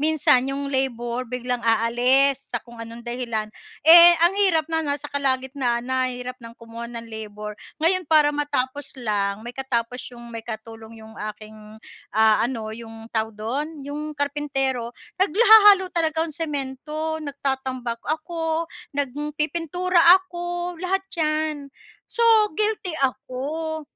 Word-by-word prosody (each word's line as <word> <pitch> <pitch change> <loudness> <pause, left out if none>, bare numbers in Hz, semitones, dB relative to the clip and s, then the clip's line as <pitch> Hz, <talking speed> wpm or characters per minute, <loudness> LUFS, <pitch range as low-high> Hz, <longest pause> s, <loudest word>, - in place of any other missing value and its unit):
Minsan 290 -4 +3
'yong 280 +1 -3
labor 245 -2 -2
biglang 250 0 -3
aalis 245 +4 +2
sa 240 - -2
kung 235 -1 -12
anong 230 +1 -9
dahilan. 235 -3 -3 0.3
Eh, 345 +1 +10
ang 345 - +4
hirap 330 -6 +3
na 320 - +2
nasa 290 -2 -2
kalagitnaan 260 -3 0
na, 260 0 0
eh, 250 - -5
hirap 255 +1 -7
ng 230 0 -12
kumuha 230 0 -9
ng 235 -1 -7
labor. 210 -1 -7 0.2
Ngayon, 340 +1 +1
para 300 -2 +5
matapos 285 -1 -2
lang, 205 -3 -2
may 240 - -6
katapos 250 -2 -2
'yong 235 -1 -12
may 230 - -5
katulong 225 0 -9
'yong 220 0 -13 0.2
aking 215 0 -13 0.4
ah, 220 -1 +5
ano, 225 -3 -2
'yung 225 0 -10
tawag 220 -1 -2
do'n, 280 +7 -4
'yong 300 +1 -6
karpentero. 270 -4 -2 0.2
Nagla 395 +5 +3
hahalo 410 -4 +7
talaga 320 -1 +1
ako - - -4
ng - - -10
semento, 305 +2 -3
nagtatambak 265 -4 -3
ako, 325 +1 -2 0.3
nagpipintura 305 +5 -1 0.2
ako, 350 0 -4
lahat 385 +1 0 0.2
'yan 305 -2 -1 0.4
So, 470 - -2 0.3
guilty 420 -3 -1
ako 290 +5 -3
270 Hz, 140 wpm, -23 LUFS, 235-310 Hz, 0.4 s, Eh